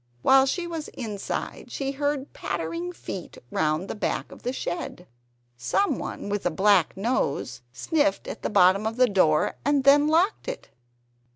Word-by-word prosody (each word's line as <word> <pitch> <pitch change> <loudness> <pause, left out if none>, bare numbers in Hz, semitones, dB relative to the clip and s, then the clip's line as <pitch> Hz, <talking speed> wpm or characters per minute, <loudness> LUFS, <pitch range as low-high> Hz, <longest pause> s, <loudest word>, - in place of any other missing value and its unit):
While 270 0 +6
she 350 +6 -1
was 330 -3 -5
inside 215 -6 -5
she 275 -1 -2
heard 285 0 -2
pattering 165 +1 -3
feet 180 +1 -8
round 155 +4 0
the - - -4
back 215 - -3
of - - -12
the 250 - -2
shed. 180 -6 -5 0.5
Someone 165 - -1
with 205 0 -2
a - - +2
black 190 0 +3
nose 195 - -1
sniffed 295 - 0
at - - -6
the - - -2
bottom 195 +3 +4
of 225 +2 -4
the 255 - +6
door, 170 -7 +2
and 285 -1 +2
them 285 +2 +6
locked 350 +10 +2
it. - - -6
220 Hz, 160 wpm, -25 LUFS, 180-285 Hz, 0.5 s, While